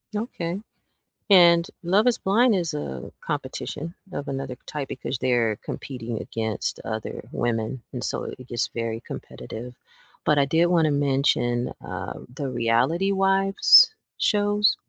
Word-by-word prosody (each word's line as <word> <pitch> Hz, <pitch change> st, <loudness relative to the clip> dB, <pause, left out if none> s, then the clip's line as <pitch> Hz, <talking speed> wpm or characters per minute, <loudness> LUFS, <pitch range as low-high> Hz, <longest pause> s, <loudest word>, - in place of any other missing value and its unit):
Okay, 195 Hz, -4 st, -3 dB, 0.7 s
and, 170 Hz, -3 st, +7 dB, 0.2 s
Love 195 Hz, +6 st, +3 dB
is 245 Hz, -2 st, +3 dB
Blind 225 Hz, +5 st, +3 dB
is 175 Hz, -5 st, 0 dB
a 65 Hz, -, -5 dB
competition 160 Hz, +3 st, -4 dB, 0.2 s
of 145 Hz, -4 st, -5 dB
another 135 Hz, -2 st, -4 dB
type 145 Hz, -3 st, -5 dB
because 130 Hz, 0 st, -4 dB
they're 120 Hz, -3 st, +1 dB
competing 120 Hz, -4 st, -5 dB
against 110 Hz, -2 st, -3 dB
other -, -, -5 dB
women, 120 Hz, +1 st, -2 dB
and 125 Hz, -, -4 dB
so -, -, -2 dB
it 130 Hz, -1 st, -8 dB
gets 120 Hz, -, -1 dB
very 115 Hz, -1 st, -3 dB
competitive, 120 Hz, +3 st, -8 dB, 0.5 s
but 150 Hz, -, +3 dB
I 140 Hz, -, +5 dB
did 160 Hz, +5 st, +3 dB
wanna 165 Hz, -3 st, +3 dB
mention, 135 Hz, -4 st, +1 dB
um, -, -, -7 dB
the 140 Hz, -1 st, -3 dB
Reality 125 Hz, +11 st, +1 dB
Wives 195 Hz, -, +6 dB, 0.2 s
Shows? 205 Hz, 0 st, +3 dB
145 Hz, 135 wpm, -25 LUFS, 120-190 Hz, 0.7 s, and